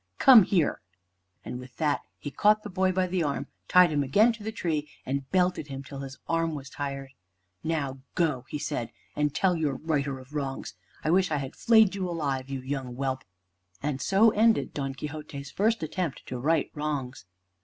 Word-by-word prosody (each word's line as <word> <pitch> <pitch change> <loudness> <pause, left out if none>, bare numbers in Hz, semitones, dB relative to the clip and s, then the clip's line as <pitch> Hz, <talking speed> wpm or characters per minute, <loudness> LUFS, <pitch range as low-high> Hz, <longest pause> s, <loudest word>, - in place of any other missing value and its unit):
Come 260 -5 +9
here!" 175 -6 +1 0.6
And 125 +3 -5
with 125 -1 -12
that 150 -4 +1 0.2
he 145 - -6
caught 215 +4 +3
the 210 - -7
boy 185 0 +2
by 185 0 +1
the 180 0 -1
arm, 145 -3 -1 0.2
tied 180 -2 +6
him 145 -1 +1
again 205 - +4
to 225 - -11
the 220 +1 -3
tree, 155 -8 -2 0.2
and 135 0 -3
belted 180 -4 +1
him 135 -1 -6
till 140 0 -8
his 135 0 -7
arm 165 -1 0
was 140 -1 -8
tired. 140 -1 -5 0.5
"Now 140 -5 -2 0.2
go," 150 -8 +1
he - - -3
said, 120 -5 -3 0.2
"and 150 0 +1
tell 190 -2 +3
your 150 -4 0
righter 140 -3 -1
of 130 +2 -14
wrongs. 135 -3 -3 0.3
I 155 - +1
wish 185 +1 +3
I 150 - 0
had 135 -1 -5
flayed 220 -4 +5
you 190 -2 -2
alive, 140 -6 -2
you 135 -1 -3
young 130 -2 -4
whelp." 130 0 -2 0.6
And 145 -2 -1
so 210 +4 +5
ended 225 +2 +3
Don 135 -2 -3
Quixote's 145 -1 -7
first 220 -1 +1
attempt 165 -1 -3
to 125 - -5
right 155 +4 +1
wrongs. 145 -7 -3
150 Hz, 190 wpm, -28 LUFS, 135-180 Hz, 0.6 s, Come